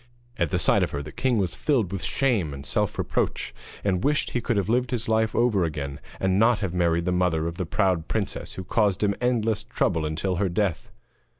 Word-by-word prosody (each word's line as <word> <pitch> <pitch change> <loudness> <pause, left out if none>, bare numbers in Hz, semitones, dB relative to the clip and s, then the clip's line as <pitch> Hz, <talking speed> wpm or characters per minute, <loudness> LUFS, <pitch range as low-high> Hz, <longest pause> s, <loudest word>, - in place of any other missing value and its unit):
At 85 -3 +1
the - - 0
sight - - +3
of - - +1
her 70 0 -4
the 75 - -8
king 130 -3 0
was 95 -5 0
filled 120 - 0
with 95 -2 -3
shame 110 - 0
and 70 0 -9
self - - -1
reproach, - - -1 0.3
and 95 -3 0
wished 150 +1 +1
he 120 - -1
could 115 -1 0
have 100 -2 0
lived 125 +2 +1
his 120 -2 -1
life 110 0 +1
over 115 -6 +3
again, 70 -4 -3 0.2
and 95 0 +2
not 115 +1 +5
have 95 -5 -3
married 85 -1 +1
the 90 - +1
mother 90 -3 +1
of 85 +1 -4
the 90 - -2
proud 95 -4 +1
princess, 105 -2 -3
who 95 - -6
caused 105 0 +1
him 100 -1 +3
endless 115 -3 +1
trouble 80 -2 0
until 80 +4 -1
her 95 +1 +1
death. 95 -1 -1
95 Hz, 220 wpm, -25 LUFS, 85-110 Hz, 0.3 s, not